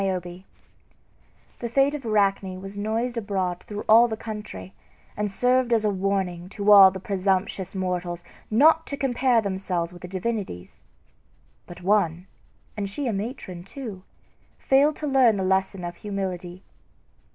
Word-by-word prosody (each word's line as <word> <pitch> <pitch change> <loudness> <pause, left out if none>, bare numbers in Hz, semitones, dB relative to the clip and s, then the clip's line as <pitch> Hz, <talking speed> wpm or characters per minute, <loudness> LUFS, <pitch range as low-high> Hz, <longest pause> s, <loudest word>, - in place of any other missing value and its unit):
NIOBE 180 -1 -3 1.1
The 235 - -4
fate 275 +4 +3
of 295 -2 -5
Arachne 195 -4 +1
was 195 +1 -8
noised 225 +4 -2
abroad 190 -5 -2
through 210 0 -6
all 230 +2 +7
the 220 -2 -4
country, 210 -3 -8 0.4
and 210 0 -1
served 250 +4 +1
as 225 -2 +2
a 210 - +2
warning 185 -2 -2
to 205 +1 +1
all 195 -2 +10
presumptuous 190 0 -2
mortals 180 -2 -3 0.3
not 315 +8 +4
to 280 - -4
compare 250 -3 +2
themselves 190 -4 -2
with 175 - -13
the 180 - -7
divinities. 190 - -5 0.9
But 175 0 -11
one, 180 -3 +1 0.5
and 200 -2 -3
she 280 +8 -4
a 235 - 0
matron 195 -4 -5
too, 205 -2 -8 0.6
failed 285 +3 +3
to 305 - -5
learn 265 -6 +4
the 190 - -2
lesson 190 0 0
of 175 0 -6
humility. 185 -3 -5
200 Hz, 145 wpm, -25 LUFS, 185-230 Hz, 1.1 s, all